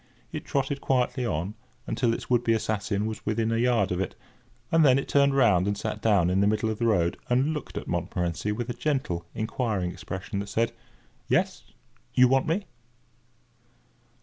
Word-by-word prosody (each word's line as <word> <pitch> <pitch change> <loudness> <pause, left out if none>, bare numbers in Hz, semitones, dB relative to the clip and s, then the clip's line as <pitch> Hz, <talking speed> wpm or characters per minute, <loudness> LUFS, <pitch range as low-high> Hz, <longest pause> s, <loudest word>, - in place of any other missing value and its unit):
It - - -5
trotted 140 0 -1
quietly 125 -1 +1
on 85 +3 -2 0.3
until 120 -3 +1
its 115 - -4
would 120 -1 +2
be 115 - +3
assassin 105 -1 -1
was 110 -1 -5
within 110 +1 0
a 115 - +1
yard 115 -6 +2
of 90 - -1
it, 95 - -3 0.6
and 165 -1 +5
then 130 -3 +6
it 135 - -2
turned 140 -1 +3
round 100 -9 +4
and 100 0 0
sat 110 +1 -4
down 100 -6 +3
in 95 +1 +2
the 100 - +4
middle 110 +1 +1
of 110 - -5
the 115 - +2
road, 85 -6 +2
and 130 +5 +2
looked 150 - -6
at - - -5
Montmorency 90 +4 -2
with 120 +3 -3
a - - -3
gentle, 120 - -2
inquiring 110 -5 -1
expression, 95 +2 -5
that 100 0 -5
said: 115 +3 +1 0.6
"Yes! - - +1 0.5
You 125 0 +7
want 135 +3 +2
me?" 185 +6 0
110 Hz, 185 wpm, -27 LUFS, 100-125 Hz, 0.6 s, You